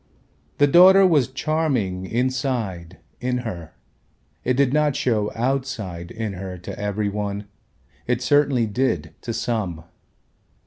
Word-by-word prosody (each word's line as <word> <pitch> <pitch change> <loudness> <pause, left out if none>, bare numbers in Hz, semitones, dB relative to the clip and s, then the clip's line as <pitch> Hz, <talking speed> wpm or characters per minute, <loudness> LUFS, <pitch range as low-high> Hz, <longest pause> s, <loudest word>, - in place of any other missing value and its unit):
The 145 - +5
daughter 185 +6 +7
was 150 -8 +4
charming 130 - -1
inside 120 -8 -2 0.2
in 125 0 -1
her, 85 -8 -7 0.7
it 125 - +1
did 135 -1 +2
not 150 -2 +2
show 105 -4 0
outside 115 -9 -2
in 110 -1 -4
her 95 0 -6
to 85 - -8
every 105 0 -1
one, 100 0 -3 0.6
it 125 0 0
certainly 140 -4 +3
did 125 +5 -1
to 120 - -4
some. 105 -9 -2
120 Hz, 125 wpm, -23 LUFS, 100-135 Hz, 0.7 s, daughter